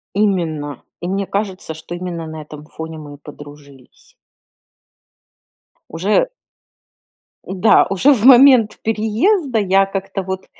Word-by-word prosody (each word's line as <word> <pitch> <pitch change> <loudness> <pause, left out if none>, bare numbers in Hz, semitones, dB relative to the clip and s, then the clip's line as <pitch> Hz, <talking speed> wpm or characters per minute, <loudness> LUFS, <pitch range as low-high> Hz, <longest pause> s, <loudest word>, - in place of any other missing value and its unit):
Именно. 165 - -1 0.2
И 175 - -5
мне 195 +1 -2
кажется, 195 -5 -4
что 160 +2 -9
именно 175 -2 -6
на 160 0 -8
этом 150 0 -12
фоне 160 0 -9
мы 145 -2 -10
и - - -15
подружились. 145 -2 -15 1.8
Уже 200 - 0 1.2
Да, 190 +3 +3
уже 195 +9 +3
в 230 -5 0
момент 255 -4 +6
переезда 225 - 0
я 195 -1 +3
как-то 195 0 -5
вот 190 0 -6
190 Hz, 120 wpm, -18 LUFS, 160-215 Hz, 1.8 s, момент